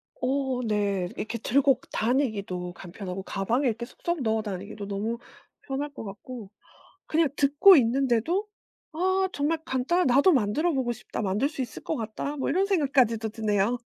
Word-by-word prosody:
어 265 -1 -1
네. 200 -4 0
이렇게 230 +2 -4
들고 270 +3 +3
다니기도 205 -8 -1
간편하고 185 +1 -7
가방에 240 +10 0
이렇게 235 +1 -1
쏙쏙 345 +4 -4
넣어 220 0 +1
다니기도 200 0 -6
너무 210 +4 -2 0.4
편할 280 +2 -3
것 - - -7
같고 210 +1 -8 0.6
그냥 320 -1 +2
듣고 290 +7 +7
있는데도 270 - +2 0.4
아 375 +3 +1
정말 295 +3 0
간단한 290 +6 +1
'나도 280 +9 +5
만들어 275 +8 +2
보고 260 -4 0
싶다. 235 -1 -6
만들 210 +8 +1
수 290 -4 -4
있을 245 - -7
것 320 - -2
같다.' 230 +6 -4
뭐 270 - -2
이런 375 +6 +2
생각까지도 265 - +2
드네요. 215 +1 0
245 Hz, 335 characters per minute, -27 LUFS, 210-285 Hz, 0.6 s, 듣고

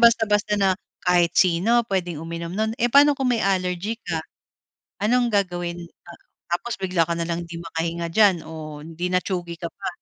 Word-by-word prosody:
basta-basta 225 -3 +4
na 190 -1 +3 0.3
kahit 175 -1 +3
sino 190 +8 +4
pwedeng 175 -5 -2
uminom 170 +1 -5
no'n. 220 +3 0
Eh, 240 -2 0
paano 285 0 +6
kung 260 -2 +1
may 230 - +1
allergy 190 +2 0
ka? - - -3 0.8
Anong 240 +3 +3
gagawin 175 -3 -1 0.3
a - - -9 0.4
tapos 195 +7 -1
bigla 180 -3 +2
ka 170 - -1
na 170 - -2
lang 170 0 -2
hindi 170 0 -8
makahinga 170 0 -3
diyan 205 -1 +5
o 155 -2 -8
di 165 +2 -4
na-tsugi 180 -1 -1
ka 170 - -3
pa. 195 - -6
180 Hz, 175 wpm, -23 LUFS, 170-215 Hz, 0.8 s, paano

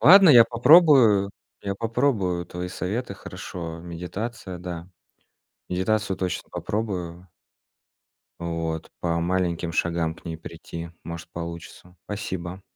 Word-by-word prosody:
Ладно, 185 - +9
я 120 -4 +9
попробую, 125 - +6 0.3
я 100 -1 -2
попробую 110 -6 0
твои 90 0 -5
советы. 100 +4 -3
Хорошо. 85 -3 -7
Медитация, 90 +3 -6
да. 85 -1 -6 0.8
Медитацию 95 +1 0
точно 90 -2 -3
попробую. 90 -5 -3 1.1
Вот. 80 -1 -3
По 85 -1 0
маленьким 85 -1 0
шагам 85 -1 0
к - - -19
ней 80 -1 -4
прийти, 85 0 -8
может, 85 -1 -7
получится. 85 +1 -8
Спасибо. 95 -3 -5
90 Hz, 110 wpm, -25 LUFS, 85-105 Hz, 1.1 s, Ладно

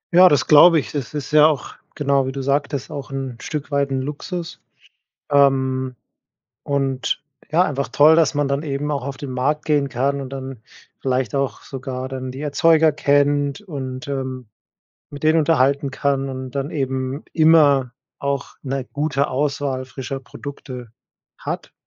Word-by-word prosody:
Ja, 185 +1 +9
das 145 -5 +2
glaube 160 +2 +7
ich. - - -6
Das 145 -1 -5
ist 145 - -4
ja 150 0 +7
auch, 150 -5 -2 0.2
genau 140 -2 +1
wie - - -2
du 135 0 -5
sagtest 140 +1 -1
auch 140 -2 -6
'n 135 -2 -4
Stück 150 -1 -5
weit 140 -1 +1
'n 135 -1 -1
Luxus. 165 +4 -6 0.7
Ähm, 130 -2 +2 0.7
und, 135 -2 -1 0.3
ja, 170 +3 +4
einfach 140 -5 -2
toll, 155 +2 +6
dass 165 -2 +3
man 145 -1 +1
dann 140 +1 0
eben 150 0 -3
auch 140 -3 -2
auf 135 0 -5
den 140 -3 -6
Markt 145 +4 -1
gehen 145 -3 +1
kann 140 +2 0
und 130 - -6
dann 135 -3 -7 0.4
vielleicht 130 -3 -1
auch 140 -1 -2
sogar 130 -1 -5
dann 130 -1 -5
die 130 +3 -7
Erzeuger 160 +1 +4
kennt 145 +2 +1
und, 135 -7 -6
ähm, 130 -2 -4 0.7
mit 145 -1 -9
denen 155 +1 +4
unterhalten 140 -3 +2
kann 135 -1 0
und 130 -1 -6
dann 140 +3 -3
eben 130 -1 -2
immer 145 -6 +5 0.3
auch 140 -1 -3
'ne 135 -1 -2
gute 145 -1 0
Auswahl 135 -1 -1
frischer 130 +1 -6
Produkte 130 -3 -9 0.5
hat - - -5
140 Hz, 160 wpm, -21 LUFS, 130-145 Hz, 0.7 s, Ja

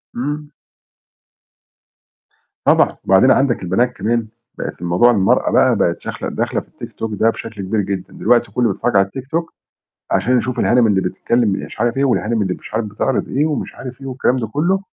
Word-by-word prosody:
امم. 145 +4 -4 2.2
طبعًا، - - +3
وبعدين 95 +7 +5
عندك 135 -7 +2
البنات 120 +8 +1
كمان، 115 +1 -1 0.3
بقِت - - -6
الموضوع 90 +8 +4
المرأة 100 -4 +2
بقى - - +4
بقِت - - 0
داخلة - - -5
داخلة - - -2
في - - -22
ال - - -4
TikTok 110 -2 -5
ده 115 +2 +3
بشكل 110 -3 -6
كبير 105 +3 0
جدًا، 95 -1 -4
دلوقتي 120 +1 +2
كُلُّه 120 -4 +1
بيتفرّج 120 +1 -2
على 95 0 +4
ال 130 - -4
TikTok 165 +5 -2 0.7
عشان 125 +1 +2
يشوف 120 +1 -2
الهانم 120 -2 +4
اللي 95 -2 +2
بتتكلم 115 +5 0
مش 100 +1 -4
عارف 120 +2 0
إيه، 140 - +2
والهانم 115 -3 +1
اللي 95 -2 0
مش - - -12
عارف 110 0 0
بتِعرِض 105 +6 -1
إيه، 145 +3 +1
ومش 155 -2 -3
عارف 130 +1 -9
إيه 135 - -7
والكلام 130 0 0
ده 115 -3 -2
كُلُّه. 170 - +1
120 Hz, 185 wpm, -18 LUFS, 105-130 Hz, 2.2 s, وبعدين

